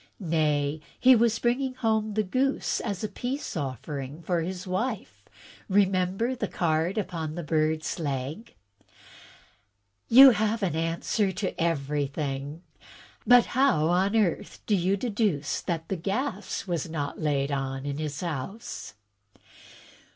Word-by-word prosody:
"Nay, 150 -1 +1 0.2
he 260 0 +7
was 230 -1 +3
bringing 255 +2 0
home 220 -3 0
the 215 - +2
goose 260 +8 0
as 200 -4 -4
a - - 0
peace 255 +6 -4
offering 140 +1 -5
to 180 - -3
his 180 +2 -5
wife. 200 +4 -3 0.5
Remember 195 +4 +2
the 220 -4 -2
card 170 +3 0
upon 165 -6 -3
the 175 - -4
bird's 155 +1 0
leg." 145 - -4 1.5
"You 265 +3 +10
have 220 0 0
an 175 -5 0
answer 165 +5 0
to 190 +1 -2
everjrthing. 145 -1 -2 0.7
But 245 -1 +7
how 250 - +2
on 190 +4 +2
earth 205 -7 0
do 210 - +2
you 190 +2 +1
deduce 200 - -1
that 165 -2 -3
the 195 - -2
gas 200 - -3
is 170 -2 -2
not 145 -2 -4
laid 145 -2 0
on 135 -1 -3
in 145 0 -3
his 150 -2 -4
house?" 170 - -5
180 Hz, 130 wpm, -27 LUFS, 150-215 Hz, 1.5 s, You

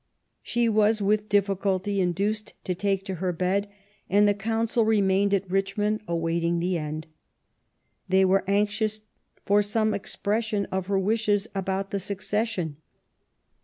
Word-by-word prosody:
She 240 0 0
was 215 0 +3
with 210 +1 +1
difficulty 200 0 +1
induced 200 +4 -1
to 185 - -1
take 195 +1 -1
to 190 - -3
her 185 -1 +1
bed, 185 +4 0 0.4
and 205 +2 +5
the 205 - +4
Council 225 +3 0
remained 200 -2 +2
at 195 -1 +1
Richmond 200 +3 0
awaiting 170 0 0
the 175 +2 0
end. 155 -1 -4 1.0
They 190 +1 +4
were 190 +1 +3
anxious 210 +2 +1 0.4
for 205 +1 +4
some 215 +1 0
expression 210 +1 -1
of 190 -1 -2
her 200 -1 +1
wishes 205 +1 +1
about 195 0 -2
the 200 - -1
succession. 195 -4 -2
200 Hz, 135 wpm, -26 LUFS, 190-210 Hz, 1.0 s, and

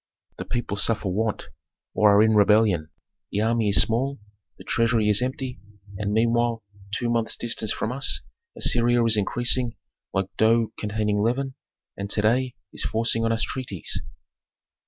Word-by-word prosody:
The - - -5
people 120 -4 -3
suffer 105 -1 +1
want, 110 +3 -1 0.5
or 105 -1 +4
are 105 - +6
in 110 0 +3
rebellion; 105 -6 +3 0.4
the 105 - -1
army 110 -1 +1
is 100 - +4
small, 130 +4 -2 0.4
the - - -12
treasury 115 -2 +1
is 105 +2 +4
empty, 130 0 -3 0.4
and 100 +1 -3
meanwhile 115 +1 +1 0.3
two 120 +3 -2
months' 115 -1 0
distance 110 -2 -2
from 110 - -2
us 135 +2 +1 0.4
Assyria 120 0 +3
is 115 -1 +4
increasing 120 +3 +1 0.4
like 95 0 -3
dough 115 0 +3
containing 105 -1 -1
leaven, 130 +4 -1 0.4
and 100 +1 -5
to 105 - +1
day 125 +3 +1 0.2
is - - -5
forcing 115 0 0
on 115 - +1
us 115 0 +1
treaties." 125 -9 -4
115 Hz, 155 wpm, -24 LUFS, 105-120 Hz, 0.5 s, are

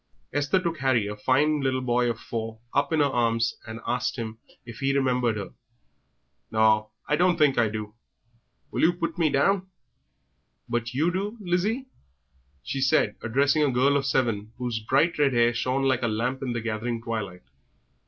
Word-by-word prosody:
Esther 145 +6 +2
took 170 -3 -3
Harry, 130 -5 +2
a 105 +1 -4
fine 145 +7 +2
little 130 -1 0
boy 120 -1 +2
of 115 -1 -3
four, 115 -1 -5 0.2
up 140 +2 +1
in 160 -2 +3
her - - +5
arms, 115 -3 +1
and 110 0 -6
asked - - -1
him 110 -3 -6 0.3
if 120 -3 -10
he 135 +1 +1
remembered 125 -4 +1
her. 100 - -6 1.0
"Naw, 110 -1 +3 0.2
I 150 - +2
don't 180 +1 +3
think 150 -4 +4
I 115 -2 +3
do. 105 -1 -5 0.8
Will - - -1
oo 170 - +4
put 175 0 -4
me 160 -2 +3
down?" 185 +7 +2 1.0
"But 120 +1 -2
you 160 +6 +2
do, 200 +5 -3
Lizzie?" 205 +7 -1 0.8
she 135 - -3
said, 115 -5 +2
addressing 140 +6 +2
a 145 - +3
girl 130 +3 +3
of 135 -1 +1
seven, 115 -5 0
whose 120 -2 -2
bright 140 +9 +1
red 140 -3 +3
hair 120 0 +3
shone 130 +3 0
like 130 -2 +2
a 120 - +1
lamp 120 +4 -1
in 130 -3 -2
the 120 - -2
gathering 115 +1 -2
twilight. 105 -6 -4
130 Hz, 180 wpm, -26 LUFS, 115-145 Hz, 1.0 s, her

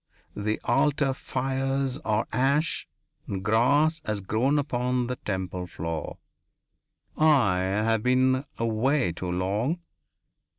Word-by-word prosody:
The 105 +1 -1
altar 140 -1 +2
fires 135 +1 -2
are 110 -1 0
ash 140 +6 +1 0.4
and 95 -1 -4
grass 145 +9 +3
has 105 -1 -2
grown 115 +9 +1
upon 125 -3 0
the 125 +1 -3
temple 95 -2 -4
floor 80 -2 -5 1.0
I 135 -12 +4
have 105 +4 +1
been 130 +2 +2
away 115 - +1
too 90 +2 -5
long. 105 - -1
125 Hz, 110 wpm, -26 LUFS, 105-135 Hz, 1.0 s, I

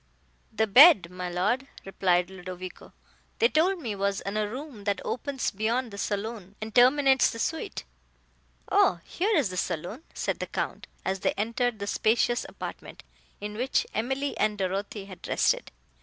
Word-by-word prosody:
"The 220 +1 +1
bed, 230 - +8
my 180 0 -5
Lord," 210 +10 0 0.2
replied 180 -2 +1
Ludovico, 185 0 -8 0.5
"they 465 - +5
told 370 +1 +2
me, 225 -4 -2
was 200 0 -1
in 200 +1 -4
a 210 -1 0
room 255 -4 -8
that 200 -2 0
opens 270 +1 -2
beyond 230 +4 -1
the 200 - -8
saloon, 205 -1 -4
and 220 0 -6
terminates 265 +2 +5
the - - -6
suite." 320 - -3 0.9
"O, 175 - +4
here 405 +3 0
is 270 -10 +2
the 185 - -6
saloon," 180 - -3
said - - -2
the - - -3
Count, - - -4 0.2
as 190 0 -1
they - - +1
entered 230 +2 -1
the 200 - -4
spacious 230 +3 +1
apartment, - - -8 0.4
in 210 +1 -5
which 250 +5 0
Emily 265 +5 -1
and 210 -1 +1
Dorothée 195 +1 -3
had 185 -3 -10
rested. - - +1
215 Hz, 160 wpm, -27 LUFS, 195-255 Hz, 0.9 s, bed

